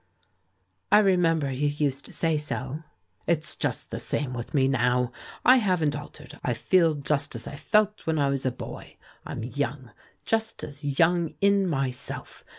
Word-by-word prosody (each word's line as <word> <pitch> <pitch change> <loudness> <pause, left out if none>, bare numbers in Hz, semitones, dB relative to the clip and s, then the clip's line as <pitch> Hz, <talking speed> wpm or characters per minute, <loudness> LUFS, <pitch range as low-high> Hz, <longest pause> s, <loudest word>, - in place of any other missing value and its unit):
"I - - +8
remember 170 -8 +3
you 140 +3 0
used 145 -2 -1
to - - -12
say 165 -1 +1
so.'* 135 -1 -3 0.5
"It's 160 -1 +1
just - - -3
the - - -3
same 140 -3 -2
with 120 +4 -5
me 135 -2 +4
now; 125 -1 +2 0.3
I 255 +1 +8
haven't 180 - +1
altered, 150 0 -10
I 120 - 0
feel 165 +5 +3
just 145 0 -1
as - - -5
I - - -6
felt 210 +4 +1
when 160 -1 +1
I 140 -2 +2
was 140 -1 -1
a 130 - +1
boy. 125 - -9 0.3
I'm - - -5
young 130 0 -3 0.2
— - - -37
just 225 0 -1
as 145 -1 -4
young 170 -1 +3
in 200 -1 +3
myself. 135 -6 -2
145 Hz, 170 wpm, -26 LUFS, 135-170 Hz, 0.5 s, I